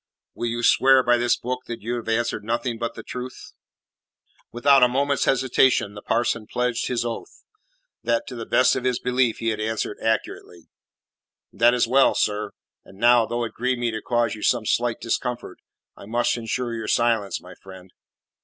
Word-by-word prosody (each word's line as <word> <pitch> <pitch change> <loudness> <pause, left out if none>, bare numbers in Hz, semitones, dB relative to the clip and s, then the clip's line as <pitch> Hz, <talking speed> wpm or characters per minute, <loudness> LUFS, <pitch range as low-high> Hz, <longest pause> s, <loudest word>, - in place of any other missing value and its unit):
"Will 120 - -3
you 120 +1 -3
swear 130 +2 +5
by 120 0 +3
this 120 0 +1
book 125 +1 -5
that 120 -3 -7
you 120 +2 -3
have 115 -1 -6
answered 115 -1 -1
nothing 115 +1 -2
but 115 -1 -3
the - - -8
truth?" 125 0 -8 1.0
Without 135 +3 +4
a 125 - +7
moment's 140 +2 0
hesitation 130 -5 +2
the 105 - -9
parson 115 -1 -1
pledged 125 -1 -1
his 120 -2 -1
oath, 115 -1 -7 0.6
that, 115 -1 0
to - - -8
the 115 -1 -7
best 125 - +3
of 125 - -3
his 125 -2 +1
belief, 125 -2 0
he 115 - -1
had 110 - -2
answered 110 -1 -3
accurately. 95 -6 -3 0.8
"That 120 +4 +4
is 120 - +2
well, 135 +3 +4
sir. 105 0 0 0.3
And 95 - -17
now, 120 +1 +4
though 120 +1 -2
it 115 - -5
grieve 125 +1 -1
me 120 -1 -1
to 110 0 -5
cause 120 -2 0
you 110 - -9
some 120 -1 +1
slight 120 +1 0
discomfort, 120 -3 -3 0.4
I 100 - -13
must 120 +2 0
ensure 120 +1 -3
your 110 -1 -5
silence, 115 -4 +1
my - - -13
friend." 95 -1 -14
120 Hz, 185 wpm, -23 LUFS, 110-125 Hz, 1.0 s, a